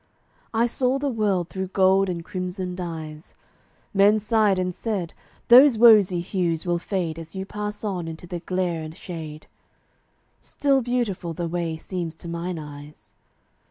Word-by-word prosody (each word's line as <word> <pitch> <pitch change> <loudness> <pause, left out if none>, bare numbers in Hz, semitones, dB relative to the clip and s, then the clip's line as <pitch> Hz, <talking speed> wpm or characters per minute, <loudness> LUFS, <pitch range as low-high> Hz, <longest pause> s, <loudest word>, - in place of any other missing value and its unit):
I 230 +1 +2
saw 250 +2 0
the 280 0 -1
world 200 -6 0
through 190 0 -4
gold 190 +1 +3
and 170 -2 -4
crimson 180 0 -4
dyes: 160 -3 -7 0.6
Men 205 +2 +5
sighed 215 -2 +2
and 180 0 -1
said, 195 -5 -3 0.3
"Those 255 0 +8
rosy 210 -6 +6
hues 170 -3 -1
will 175 -1 0
fade 170 -4 -3
As 165 +2 -10
you 190 0 -4
pass 210 +1 -5
on 185 -5 -3
into 165 +1 -8
the 175 0 -5
glare 180 -1 -2
and 155 +1 -8
shade!" 155 -3 -8 1.0
Still 275 -2 +1
beautiful 230 -8 -2
the 170 +1 -3
way 165 -1 -2
seems 170 -1 -5
to 170 - -11
mine 170 +1 -4
eyes. 150 -1 -11
180 Hz, 155 wpm, -24 LUFS, 170-210 Hz, 1.0 s, Those